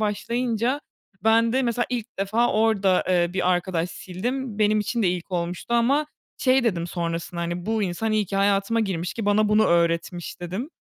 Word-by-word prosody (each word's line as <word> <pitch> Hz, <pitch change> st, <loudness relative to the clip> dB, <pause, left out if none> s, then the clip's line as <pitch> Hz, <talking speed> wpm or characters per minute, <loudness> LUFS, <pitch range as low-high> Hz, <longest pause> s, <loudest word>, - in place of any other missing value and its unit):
başlayınca 235 Hz, +4 st, -1 dB, 0.4 s
ben 225 Hz, +1 st, +4 dB
de 265 Hz, +1 st, +2 dB
mesela 240 Hz, 0 st, 0 dB
ilk 240 Hz, -3 st, -5 dB
defa 215 Hz, +5 st, +1 dB
orada, 210 Hz, -4 st, +2 dB
eee, 175 Hz, -2 st, +2 dB
bir 185 Hz, -1 st, +1 dB
arkadaş 175 Hz, -1 st, -1 dB
sildim. 225 Hz, +8 st, -4 dB
Benim 215 Hz, 0 st, +3 dB
için 230 Hz, +3 st, -1 dB
de 190 Hz, -, +3 dB
ilk 175 Hz, +1 st, -3 dB
olmuştu. 175 Hz, +6 st, -2 dB
Ama 275 Hz, +6 st, +3 dB, 0.3 s
şey 260 Hz, -1 st, +3 dB
dedim 175 Hz, -7 st, 0 dB
sonrasında: 170 Hz, 0 st, -4 dB
"Bu 220 Hz, 0 st, 0 dB
insan 200 Hz, +4 st, -1 dB
iyi 215 Hz, -2 st, +1 dB
ki 195 Hz, -, -3 dB
hayatıma 200 Hz, +3 st, +2 dB
girmiş 180 Hz, -5 st, -2 dB
ki 225 Hz, -3 st, -4 dB
bana 210 Hz, +1 st, +3 dB
bunu 210 Hz, +1 st, +4 dB
öğretmiş," 170 Hz, +1 st, 0 dB
dedim. 190 Hz, -, -5 dB
205 Hz, 170 wpm, -24 LUFS, 180-230 Hz, 0.4 s, ben